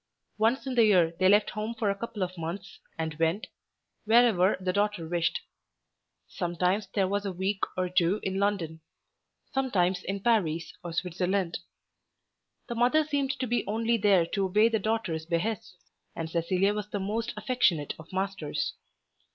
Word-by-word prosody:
Once 230 +6 +2
in 265 - -2
the 235 -2 +5
year 175 -6 +4
they 185 0 +5
left 205 +1 +4
home 215 +2 -4
for 215 -3 +1
a - - -2
couple 210 -1 -4
of 185 0 -4
months 175 +3 -6 0.2
and 160 -1 -4
went, 165 +6 +1 0.6
wherever 220 -4 +4
the 185 -1 -1
daughter 205 -4 0
wished. 170 0 0 0.9
Sometimes 180 +3 -1
there 195 -2 +3
was 200 +1 -1
a 200 - -2
week 190 +2 -2 0.2
or 185 0 +1
two 180 +2 +2
in 190 0 -1
London; 180 -6 -1 0.7
sometimes 190 -9 +1
in 200 +1 -3
Paris 170 -8 +1
or 175 - -5
Switzerland. 180 +1 -1 1.1
The 240 - -3
mother 245 +7 +3
seemed 285 -2 -1
to 260 - -1
be 240 0 0
only 225 +3 +1
there 200 -5 +4
to 195 +3 -1
obey 210 +4 +4
the 225 -1 +1
daughter's 195 -7 -2
behests, 180 +2 -2 0.4
and 165 - -3
Cecilia 180 +4 +1
was 210 0 -4
the 205 - -3
most 220 +5 -2
affectionate 180 - +1
of 160 - -12
masters. 190 -5 -2
195 Hz, 160 wpm, -28 LUFS, 175-220 Hz, 1.1 s, the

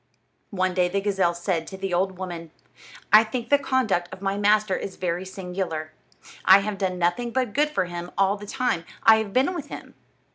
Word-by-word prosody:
One 185 -2 -1
day 180 -1 +2
the 200 +2 0
gazelle 195 -4 +1
said 170 -2 -2
to 190 - -8
the 190 -1 -4
old 185 +1 0
woman: 175 -3 -6 0.6
"I 215 +1 +9
think 230 +2 -5
the 285 - +5
conduct 245 -11 0
of - - -9
my 195 0 -1
master 205 -1 +2
is 190 - -5
very 180 +1 -3
singular. 180 -4 -4 0.5
I 190 +1 +7
have 205 -1 -4
done 185 -2 -1
nothing 175 +8 0
but 250 -3 -1
good 300 +4 +2
for 300 - 0
him 175 0 -6
all 195 +1 +3
the 205 0 -10
time 250 -9 -1 0.2
I 220 0 +7
have 220 -2 -3
been 265 - +2
with 335 -6 -6
him. - - -9
195 Hz, 205 wpm, -24 LUFS, 180-215 Hz, 0.6 s, I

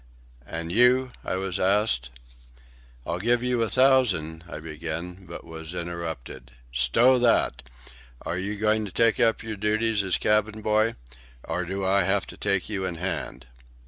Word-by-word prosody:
"And 85 0 -5
you?" 125 +4 +4
I - - -2
was 95 -1 -2
asked. 95 - +1 1.0
"I'll 85 - -2
give 120 +4 +1
you 125 -1 0
a 115 - +1
thousand—" 110 - +3
I - - -6
began, 80 +4 -6
but 85 - -8
was 80 +1 -8
interrupted. 80 -8 -6 0.2
"Stow 115 - +4
that! 115 - +2 0.6
Are 90 - -3
you 100 +3 -3
going 110 +1 +1
to 100 - -7
take 115 +3 +2
up 115 -1 +2
your 110 -1 -5
duties 105 +1 +1
as 95 -2 +1
cabin 105 0 +1
boy? 110 +2 +2 0.5
Or 90 +2 -3
do 95 +2 -3
I 100 +1 +4
have 95 +2 +1
to - - -12
take 100 -3 0
you 100 -3 -3
in 90 -2 -3
hand?" 85 -6 -4
95 Hz, 160 wpm, -26 LUFS, 85-110 Hz, 1.0 s, you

